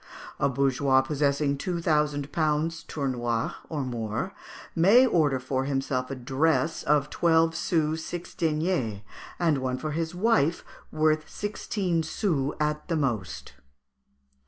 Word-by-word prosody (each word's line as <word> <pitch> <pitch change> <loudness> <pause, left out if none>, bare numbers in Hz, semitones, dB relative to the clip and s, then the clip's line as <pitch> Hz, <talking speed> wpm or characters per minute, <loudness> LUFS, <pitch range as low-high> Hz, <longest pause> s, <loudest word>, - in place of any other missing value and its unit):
A - - +2
bourgeois 135 0 +3
possessing 140 0 0
two 175 +1 -2
thousand 150 -3 0
pounds 155 +1 0
(tournois) 120 -5 -1 0.2
or 150 -4 -2
more, 120 - -3 0.4
may 200 +10 +6
order 150 - +2
for 130 +1 -2
himself 135 -2 -1
a 135 - -4
dress 155 +6 0
of 150 -1 +1
twelve 165 -1 +3
sous 160 -1 0
six 175 +1 -6
deniers, 155 - -1 0.4
and 135 -7 0
for 155 - -3
his 165 +2 -3
wife 180 -5 +2 0.2
one 155 0 -4
worth 155 0 +2
sixteen 200 -4 -2
sous 160 -4 -1
at 150 0 -1
the 170 - 0
most." 120 -11 -2
150 Hz, 130 wpm, -27 LUFS, 135-165 Hz, 0.4 s, may